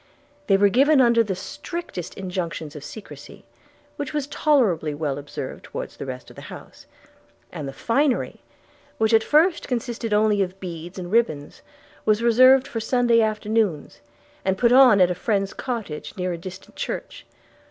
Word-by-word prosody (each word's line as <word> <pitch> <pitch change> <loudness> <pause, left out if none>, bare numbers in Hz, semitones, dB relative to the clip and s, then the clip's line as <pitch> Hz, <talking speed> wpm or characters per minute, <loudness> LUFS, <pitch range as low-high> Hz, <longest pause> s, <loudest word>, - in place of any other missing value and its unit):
They 195 - +5
were 200 +1 +4
given 275 +7 +4
under 235 -2 +5
the 200 -4 -3
strictest 290 - -7
injunctions 170 -5 -5
of 145 - -8
secrecy, 205 +8 -11 0.5
which 285 - -5
was 295 -2 -1
tolerably 225 - +1
well 145 -2 -2
observed 145 0 -7
towards - - -7
the - - -7
rest 125 -1 -7
of - - -16
the - - -10
house; - - -12 0.6
and 150 -5 -6
the - - -5
finery, 255 - 0 0.6
which 220 +1 +1
at 220 0 +5
first 330 +4 +3
consisted 235 -2 -3
only 210 -1 +3
of 190 0 -3
beads 175 -1 -7
and 180 -1 -6
ribbands 160 -11 0 0.4
was 215 +1 +2
reserved 255 +3 +6
for 235 -5 -4
Sunday 235 0 +2
afternoons, 215 -6 -1 0.4
and 190 0 0
put 235 +3 +3
on 250 -5 +7
at 180 0 +5
a - - +1
friend's 200 +1 -1
cottage 220 - -5
near 180 -1 -2
a - - -4
distant 185 +2 -10
church. - - -6
210 Hz, 165 wpm, -23 LUFS, 180-245 Hz, 0.6 s, on